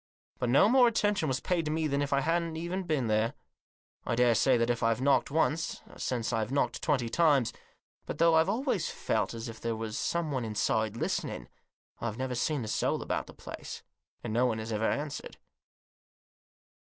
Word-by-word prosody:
But 125 - 0
no 140 +10 +6
more 250 +1 +6
attention 205 -6 +1
was 130 -1 0
paid 175 -2 0
to - - -1
me 160 0 0
than 140 -1 0
if 145 - -2
I 140 0 +3
hadn't 170 +3 -1
been 145 -6 +1
there. 110 +4 +1 0.7
I - - -1
daresay 125 +1 +4
that 115 +1 +2
if 120 - -2
I've 115 0 +2
knocked 140 +1 +3
once 160 +2 0
since 120 -3 -2
I've 110 +1 -1
knocked 140 - 0
twenty 125 -4 +1
times; 145 -3 +3 0.5
but, - - -4
though 165 0 +5
I've 160 +3 +4
always 230 - 0
felt - - -1
as 115 +1 -5
if 115 -1 -9
there 115 -1 -1
was 110 -1 -4
someone 155 -7 -1
inside 110 0 0
listening, - - -3 0.5
I've 115 -2 -3
never 130 0 -2
seen 140 +2 0
a - - -5
soul - - 0
about - - -2
the - - -13
place, - - -8 0.4
and - - -3
no 125 +2 +3
one 115 -2 -1
has 110 0 -4
ever 110 +1 +1
answered. 145 0 -4
135 Hz, 185 wpm, -30 LUFS, 115-160 Hz, 0.7 s, no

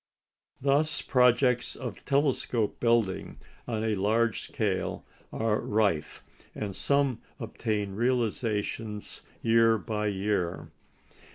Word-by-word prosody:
Thus 145 +3 +1
projects 125 -1 +3
of 125 -6 -7
telescope 135 -6 +1
building 115 -5 +1 0.3
on 110 -2 -2
a 110 -1 +1
large 110 +3 +1
scale 100 -4 -2 0.3
are 110 -1 0
rife, 100 -8 0 0.3
and 100 -3 -4
some 140 -4 +1 0.2
obtain 105 -3 -2
realisation 110 -2 -1 0.4
year 115 0 +5
by 105 -1 -2
year. 95 -3 -1
110 Hz, 95 wpm, -28 LUFS, 105-125 Hz, 0.4 s, year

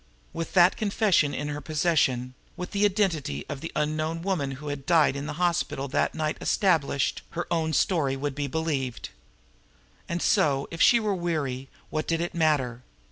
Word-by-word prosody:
With 165 0 -5
that 180 0 +5
confession 200 -8 +2
in 145 +2 -3
her 145 0 -4
possession, 145 -6 +1 0.2
with 180 - -5
the 205 0 +2
identity 175 - 0
of 140 -1 -6
the 165 - -5
unknown 155 +2 -1
woman 160 -8 -1
who 145 +3 -7
had 140 -1 -6
died 160 -5 +4
in 140 +1 -4
the 155 - -4
hospital 170 -5 0
that - - 0
night 155 -1 -1
established, 155 -8 +1 0.2
her 175 - -1
own 160 -2 +1
story 155 -5 +1
would 140 +1 -3
be 145 +1 -3
believed. 140 -4 -2 1.0
And 170 - -1
so, 145 -9 +2
if 165 - -4
she 240 - +6
were 215 -2 0
weary, 150 -8 -2 0.2
what 155 0 -2
did 165 0 +1
it 170 +1 -3
matter? 145 -7 +1
155 Hz, 175 wpm, -26 LUFS, 140-175 Hz, 1.0 s, she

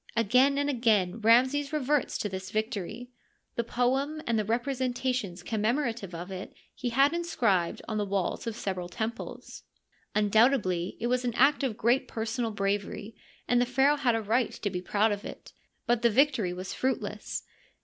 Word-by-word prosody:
Again 250 +5 +4
and 285 0 +1
again 225 -7 +2
Ramses 260 +6 +4
reverts 295 -2 0
to - - -2
this 190 -1 -6
victory; 220 +2 -3 0.4
the 235 - -1
poem 265 +6 0
and 230 -2 +1
the - - +1
representations 245 -4 -1
commemorative 225 - -1
of 175 +3 -7
it 185 0 -7 0.2
he 250 - -3
had 275 +5 +4
inscribed 230 - 0
on 215 -1 -2
the 205 - 0
walls 195 +3 -2
of 225 - -3
several 185 -5 -4
temples. 220 +6 -5 0.5
Undoubtedly 210 -4 +2
it 230 - -3
was 250 +1 +1
an 240 -2 -2
act 280 +4 +4
of 255 -6 -1
great 250 +3 +2
personal 230 +1 -2
bravery, 205 +1 -2 0.3
and 245 0 +3
the - - +3
pharaoh 270 +4 +3
had 250 -5 +2
a 225 - -1
right 230 +3 +1
to 205 - -3
be 180 -1 -3
proud 210 +4 +2
of 205 0 -3
it; - - -10 0.3
but 240 -1 +2
the 235 - +5
victory 250 -5 +3
was 185 +1 -5
fruitless. 260 +1 -2
230 Hz, 170 wpm, -28 LUFS, 205-255 Hz, 0.5 s, the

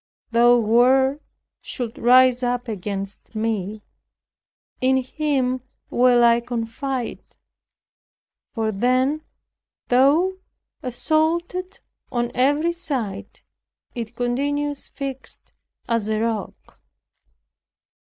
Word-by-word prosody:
Though 240 +1 +6
war 255 +5 +4 0.4
should 240 -4 -5
rise 255 +1 +5
up 245 0 -1
against 200 0 -6
me, 215 -1 -2 1.0
in 260 +1 +3
him 260 -1 -1 0.3
will 245 -1 +4
I 235 0 +5
confide." 240 +2 -4 1.3
For 220 -2 0
then, 255 +8 +1 0.7
though 305 +10 +3 0.4
assaulted 325 +8 -1 0.3
on 240 -1 -1
every 290 +6 +2
side, 265 - -4 0.5
it 235 -1 -6
continues 285 +4 -1
fixed 270 -2 -7 0.3
as 230 -2 0
a 215 0 0
rock. 225 -1 -4
250 Hz, 85 wpm, -22 LUFS, 230-275 Hz, 1.3 s, Though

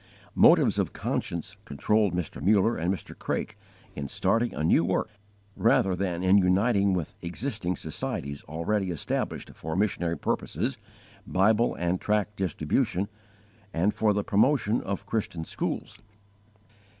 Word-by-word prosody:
Motives - - +5
of - - -1
conscience 85 +4 -3
controlled 105 -2 +1
Mr. 90 -4 -4
Muller 105 +3 +3
and 85 +3 0
Mr. 95 - -5
Craik - - -3 0.4
in 70 -1 -4
starting 115 - +1
a 75 - -4
new 80 +1 +4
work 95 +4 0 0.5
rather 95 -1 +3
than 90 -2 -2
in 95 +2 +6
uniting 100 +1 +3
with 85 -4 -3
existing 90 0 -3
societies 70 -2 -4
already 90 +6 -1
established 85 -4 -3
for 80 +1 -5
missionary 90 -4 0
purposes, - - -2 0.5
Bible 110 +5 +3
and 90 +1 -1
tract 105 0 0
distribution, 95 - 0 0.7
and 95 +6 +2
for 110 0 +2
the 105 0 0
promotion 110 +2 +2
of 100 +1 -4
Christian 100 -6 -3
schools. - - -4
95 Hz, 130 wpm, -27 LUFS, 85-105 Hz, 0.7 s, in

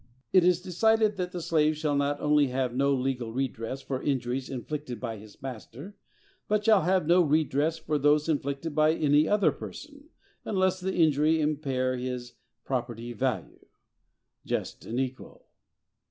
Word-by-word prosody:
It 185 -2 +6
is 180 0 +3
decided 215 +3 +2
that 180 -1 -3
the 175 -2 -5
slave 155 -2 +2
shall 150 -2 0
not 140 0 0
only 150 -1 +3
have 130 -1 -1
no 140 +2 +2
legal 125 -3 -1
redress 130 0 -3
for 130 -2 -3
injuries 130 -2 -2
inflicted 135 0 -5
by 115 -3 -4
his 105 0 -14
master, 135 - -8 0.5
but 210 0 0
shall 215 -4 +6
have 185 +1 +2
no 175 +3 +5
redress 155 0 +1
for 155 -2 -2
those 150 +2 +3
inflicted 145 0 -2
by 155 +1 +3
any 150 0 +3
other 205 -1 +3
person, 290 0 -10 0.3
unless 190 -2 +1
the 190 +1 -3
injury 155 -1 +3
impair 135 -4 0
his 125 -1 -5 0.3
property 120 -2 -3
value.—Just 125 +1 -6
and 120 +3 -2
equal! 130 -1 -5
145 Hz, 150 wpm, -28 LUFS, 130-170 Hz, 0.5 s, It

